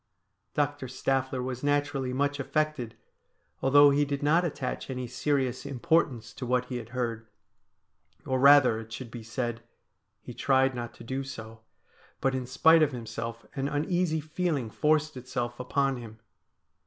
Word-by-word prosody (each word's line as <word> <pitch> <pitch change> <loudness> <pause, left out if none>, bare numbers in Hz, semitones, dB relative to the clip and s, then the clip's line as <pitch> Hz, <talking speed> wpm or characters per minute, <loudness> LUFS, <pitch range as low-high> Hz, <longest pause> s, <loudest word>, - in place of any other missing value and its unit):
Doctor 145 -2 0
Staffler 130 0 -1
was 130 0 -5
naturally 145 -2 0
much 145 +2 0
affected, 145 -5 -1 0.7
although 145 +2 +7
he 145 +1 +3
did 140 0 -2
not 160 +4 +4
attach 140 -7 -3
any 130 -1 -3
serious 130 0 -1
importance 135 -3 0
to - - -8
what 125 0 +1
he 125 0 -4
had 115 -2 -8
heard; 115 -3 -3 1.0
or 130 0 0
rather, 140 -4 +7
it 110 0 -10
should 115 +1 -7
be 120 - -7
said, 115 +1 -3 0.6
he - - -10
tried 135 0 +2
not 120 -1 -6
to - - -12
do 130 +3 -3
so, 110 -4 -9 0.6
but 135 - +1
in 130 -1 -3
spite 160 +5 +5
of 150 -2 +3
himself 115 0 -6
an 135 0 -2
uneasy 160 +3 0
feeling 155 -6 -2
forced 155 +2 +1
itself 125 -1 -4
upon 135 +1 0
him. 115 -2 -10
130 Hz, 155 wpm, -28 LUFS, 120-145 Hz, 1.0 s, although